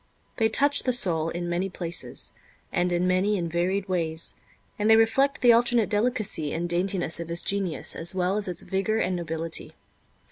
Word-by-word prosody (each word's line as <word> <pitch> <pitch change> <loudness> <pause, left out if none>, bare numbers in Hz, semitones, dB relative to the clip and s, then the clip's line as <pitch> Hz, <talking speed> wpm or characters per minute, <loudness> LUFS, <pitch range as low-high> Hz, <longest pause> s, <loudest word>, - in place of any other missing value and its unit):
They 225 -1 +2
touch 285 +5 +3
the 255 - +1
soul 165 -9 +4
in 175 +1 -4
many 175 +3 -2
places, 175 -2 -3 0.4
and 180 0 0
in 175 +1 0
many 190 +3 +1
and 170 -2 -3
varied 185 +3 -1
ways, 165 -3 -2 0.4
and 210 +1 +1
they 220 - +8
reflect 265 +6 +2
the 240 -1 +7
alternate 235 -2 +2
delicacy 210 - 0
and 170 +2 -2
daintiness 175 -1 0
of 170 -1 -6
his 170 +1 0
genius 195 -4 -1
as 170 +3 0
well 185 +1 0
as 210 -1 -1
its 180 -2 -4
vigor 195 +3 -1
and 185 -4 0
nobility. 165 -1 -3
185 Hz, 180 wpm, -25 LUFS, 170-215 Hz, 0.4 s, they